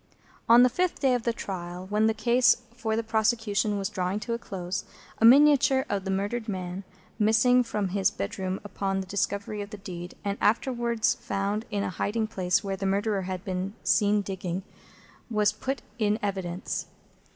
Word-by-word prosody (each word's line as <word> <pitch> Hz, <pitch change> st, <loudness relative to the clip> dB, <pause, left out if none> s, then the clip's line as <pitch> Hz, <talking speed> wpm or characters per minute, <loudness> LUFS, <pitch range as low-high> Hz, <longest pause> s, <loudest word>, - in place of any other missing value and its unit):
On 235 Hz, +1 st, +9 dB
the -, -, +7 dB
fifth 360 Hz, +7 st, -1 dB
day 265 Hz, -2 st, +3 dB
of 245 Hz, -, +1 dB
the 235 Hz, -, 0 dB
trial, 180 Hz, -4 st, -6 dB
when 215 Hz, +1 st, +3 dB
the 220 Hz, -, +1 dB
case 235 Hz, +3 st, +4 dB, 0.2 s
for 225 Hz, -3 st, -1 dB
the 230 Hz, -, -1 dB
prosecution 220 Hz, -2 st, +1 dB
was 195 Hz, -1 st, -1 dB
drawing 190 Hz, -1 st, -2 dB
to 235 Hz, -, -3 dB
a 230 Hz, -, -2 dB
close, 185 Hz, -2 st, -4 dB, 0.4 s
a 225 Hz, -, +4 dB
miniature 275 Hz, +1 st, +6 dB
of 200 Hz, -1 st, -1 dB
the -, -, -3 dB
murdered 205 Hz, +4 st, -2 dB
man, 185 Hz, -1 st, -4 dB, 0.4 s
missing 225 Hz, +4 st, +4 dB
from 210 Hz, -5 st, -2 dB
his 195 Hz, 0 st, +2 dB
bedroom 185 Hz, -, -4 dB
upon 195 Hz, -1 st, -2 dB
the 190 Hz, -, -4 dB
discovery 200 Hz, +2 st, -2 dB
of 200 Hz, -, -6 dB
the 210 Hz, -, -8 dB
deed, 175 Hz, -3 st, -8 dB
and 200 Hz, 0 st, -2 dB
afterwards 235 Hz, 0 st, +1 dB
found 200 Hz, +3 st, -2 dB
in 200 Hz, -1 st, -1 dB
a 190 Hz, -, -2 dB
hiding 220 Hz, +5 st, -1 dB
place 190 Hz, -3 st, 0 dB
where 195 Hz, -1 st, -2 dB
the 195 Hz, 0 st, -2 dB
Murderer 200 Hz, +1 st, 0 dB
had 185 Hz, 0 st, -5 dB
been 190 Hz, +2 st, -3 dB
seen 205 Hz, -1 st, +3 dB
digging, 190 Hz, -1 st, -4 dB, 0.7 s
was 210 Hz, -2 st, +2 dB
put 260 Hz, +6 st, -4 dB, 0.2 s
in 210 Hz, -1 st, +2 dB
evidence. 190 Hz, -3 st, -3 dB
205 Hz, 180 wpm, -27 LUFS, 190-225 Hz, 0.7 s, On